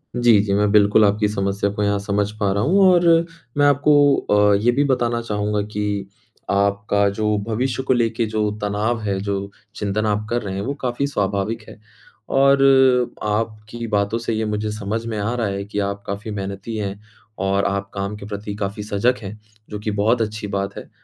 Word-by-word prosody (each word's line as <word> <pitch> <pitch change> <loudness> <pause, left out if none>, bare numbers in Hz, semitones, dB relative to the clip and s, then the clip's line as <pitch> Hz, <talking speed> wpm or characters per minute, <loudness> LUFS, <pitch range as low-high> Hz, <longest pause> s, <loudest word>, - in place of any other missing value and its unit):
जी, 120 -3 +5
जी। 100 -1 -1
मैं 105 +1 +2
बिल्कुल 105 +1 +5
आपकी 105 +1 +2
समस्या 100 0 -1
को 105 - -2
यहाँ 100 0 +1
समझ 100 +1 -1
पा 100 -2 +1
रहा 100 +1 0
हूँ 185 - +3
और 175 -1 +3 0.5
मैं 145 - +4
आपको 145 0 +5 0.2
अ, 105 0 +5
ये 110 +5 +3
भी 140 +4 +2
बताना 120 -3 0
चाहूँगा 105 -2 -1
कि 100 -2 -2 0.4
आपका 100 +1 +1
जो 105 -1 +1
भविष्य 125 +3 -1
को 130 - +2
लेकर 115 -1 +1
जो 110 -1 0
तनाव 105 +3 -1
है, 100 -2 -1
जो 100 0 -3 0.2
चिंतन 105 +1 -1
आप 105 0 0
कर 120 0 0
रहे 100 -2 -5
हैं 100 - -3
वो 140 +7 -2
काफ़ी 125 +2 -1
स्वाभाविक 105 -2 -1
है - - -13 0.5
और 135 0 +4 0.6
आपकी 110 +2 -3
बातों 105 +1 0
से 115 0 -3
ये 110 0 -1
मुझे 105 0 -2
समझ 105 +2 -3
में 115 -2 -3
आ 105 +3 -1
रहा 115 -4 -1
है 100 0 -3
कि 105 0 -4
आप 100 0 -3
काफ़ी 100 +3 -5
मेहनती 100 +2 -5
हैं 100 -1 -4 0.5
और 100 0 +1
आप 100 0 -2
काम 100 +1 -3
के 105 - -9
प्रति 105 0 -6
काफ़ी 105 0 -4
सजग 105 +5 0
हैं। 105 +2 -8 0.3
जो 105 - -5
कि 105 +1 -3
बहुत 115 +3 +2
अच्छी 105 -1 -3
बात 100 0 -3
है - - -9
105 Hz, 195 wpm, -21 LUFS, 100-115 Hz, 0.6 s, जी